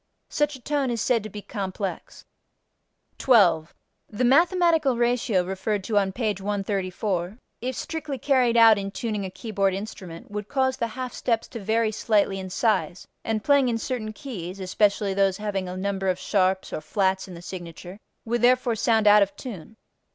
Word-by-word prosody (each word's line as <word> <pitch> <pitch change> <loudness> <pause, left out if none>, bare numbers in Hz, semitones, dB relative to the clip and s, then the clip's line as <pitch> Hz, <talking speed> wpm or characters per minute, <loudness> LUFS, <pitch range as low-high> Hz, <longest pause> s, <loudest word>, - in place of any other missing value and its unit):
Such 295 -1 0
a - - -11
tone 280 0 -1
is 235 -1 -2
said 230 +1 +2
to 215 - -7
be 205 0 -8
complex. 195 -1 -5 0.9
12. 180 -10 +4 0.3
The 215 +4 -2
mathematical 325 -1 +3
ratio 240 -5 +1
referred 190 +2 -2
to 210 +1 +2
on 195 -1 0
page 210 -2 -2
134, 195 -1 -2 0.2
if 255 +1 -3
strictly 310 -4 -4
carried 250 -2 +2
out 225 -2 +7
in 195 0 -4
tuning 210 -1 -3
a - - -4
keyboard 195 -1 -1
instrument 190 -4 -8
would 210 0 -5
cause 260 -1 +1
the 235 - -1
half 255 +2 -6
steps 230 -2 -1
to 230 - -7
vary 220 +2 +1
slightly 205 -3 +1
in 190 0 -6
size, 195 -2 0 0.2
and 220 -1 -2
playing 280 -3 +4
in 230 - 0
certain 230 -3 -4
keys 195 -6 -7
(especially 200 +1 +1
those 195 -1 +2
having 195 -3 -3
a 180 - -6
number 195 0 -1
of 180 - 0
sharps 190 -1 0
or - - -3
flats 190 +3 0
in 185 - -9
the 170 - -10
signature) 175 +1 -8 0.3
would 235 0 -1
therefore 250 -1 +3
sound 220 0 +2
out 210 0 +7
of 200 0 +1
tune. 220 -3 -9
210 Hz, 175 wpm, -25 LUFS, 190-240 Hz, 0.9 s, out